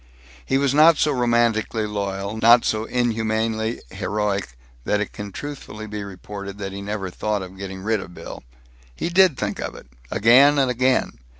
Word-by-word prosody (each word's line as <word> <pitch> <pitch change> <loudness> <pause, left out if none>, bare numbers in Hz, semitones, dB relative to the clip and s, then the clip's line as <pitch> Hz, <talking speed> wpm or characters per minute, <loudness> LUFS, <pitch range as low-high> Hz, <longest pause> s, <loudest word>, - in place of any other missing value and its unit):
He 135 - +1
was 140 -1 +1
not 155 +2 +6
so 150 - +2
romantically 120 -3 +1
loyal, 100 0 -3
not 115 +2 +6
so 110 0 0
inhumanly 110 -1 -1
heroic, 100 - -2 0.3
that 105 - +1
it 105 - -3
can 105 -1 -7
truthfully 110 -5 -7
be 105 -1 -5
reported 100 0 -8
that 100 -1 -5
he 100 +1 -6
never 100 -2 -4
thought 105 +1 -2
of 95 0 -10
getting 95 -1 -7
rid 110 0 +1
of 90 -2 -10
Bill. - - -9 0.5
He - - -3
did 180 -5 +4
think 105 -1 -3
of - - -4
it, - - -12 0.2
again 130 +7 +5
and 135 -2 +3
again. 125 - +1
110 Hz, 175 wpm, -22 LUFS, 100-120 Hz, 0.5 s, not